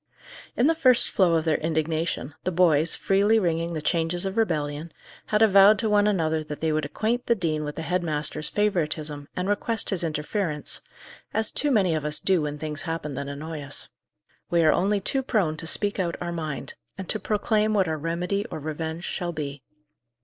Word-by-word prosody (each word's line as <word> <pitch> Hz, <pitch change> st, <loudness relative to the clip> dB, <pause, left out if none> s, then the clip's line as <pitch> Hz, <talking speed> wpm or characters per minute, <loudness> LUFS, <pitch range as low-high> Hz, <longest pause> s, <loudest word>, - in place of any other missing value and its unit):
In 240 Hz, -, +3 dB
the 325 Hz, -, +5 dB
first 255 Hz, -7 st, +4 dB
flow 180 Hz, -4 st, +3 dB
of 160 Hz, 0 st, 0 dB
their 160 Hz, -2 st, +2 dB
indignation, 160 Hz, -2 st, -2 dB
the 185 Hz, -, -1 dB
boys, 165 Hz, -3 st, +4 dB
freely 200 Hz, +3 st, +3 dB
ringing 170 Hz, -3 st, 0 dB
the 155 Hz, -2 st, -4 dB
changes 170 Hz, +2 st, 0 dB
of 195 Hz, +1 st, -3 dB
rebellion, 155 Hz, -7 st, -1 dB, 0.4 s
had 210 Hz, +1 st, +3 dB
avowed 200 Hz, 0 st, +7 dB
to 215 Hz, 0 st, 0 dB
one 205 Hz, 0 st, +4 dB
another 160 Hz, -6 st, +1 dB
that 150 Hz, -1 st, -7 dB
they 160 Hz, -1 st, 0 dB
would 155 Hz, -1 st, 0 dB
acquaint 225 Hz, +10 st, -2 dB
the 235 Hz, -, +4 dB
dean 160 Hz, -6 st, -1 dB
with 150 Hz, 0 st, -5 dB
the 160 Hz, -, -5 dB
head 180 Hz, +2 st, 0 dB
master's 150 Hz, -2 st, -1 dB
favouritism, 155 Hz, -8 st, -1 dB
and 180 Hz, +1 st, -2 dB
request 220 Hz, +3 st, 0 dB
his 185 Hz, -3 st, +1 dB
interference 155 Hz, 0 st, -2 dB, 0.5 s
as 220 Hz, 0 st, +2 dB
too 295 Hz, -, 0 dB
many 200 Hz, -10 st, +3 dB
of 155 Hz, -2 st, -1 dB
us 150 Hz, 0 st, 0 dB
do 190 Hz, -3 st, +2 dB
when 150 Hz, 0 st, -3 dB
things 150 Hz, -1 st, -4 dB
happen 165 Hz, -3 st, -4 dB
that 140 Hz, +1 st, -4 dB
annoy 150 Hz, +2 st, -6 dB
us. 145 Hz, 0 st, -6 dB, 0.6 s
We 170 Hz, -1 st, +3 dB
are 155 Hz, -, +5 dB
only 200 Hz, +3 st, +1 dB
too 270 Hz, +7 st, 0 dB
prone 205 Hz, -, 0 dB
to 165 Hz, -, -5 dB
speak 205 Hz, +4 st, +2 dB
out 175 Hz, -2 st, -1 dB
our 175 Hz, -1 st, -4 dB
mind, 155 Hz, -4 st, -4 dB, 0.2 s
and 190 Hz, -2 st, -6 dB
to 215 Hz, -, -1 dB
proclaim 215 Hz, 0 st, +1 dB
what 190 Hz, -3 st, +3 dB
our 160 Hz, -1 st, -2 dB
remedy 175 Hz, +5 st, -1 dB
or -, -, -5 dB
revenge 160 Hz, +2 st, -5 dB
shall 175 Hz, -2 st, -3 dB
be. 145 Hz, -3 st, -5 dB
170 Hz, 200 wpm, -25 LUFS, 155-200 Hz, 0.6 s, avowed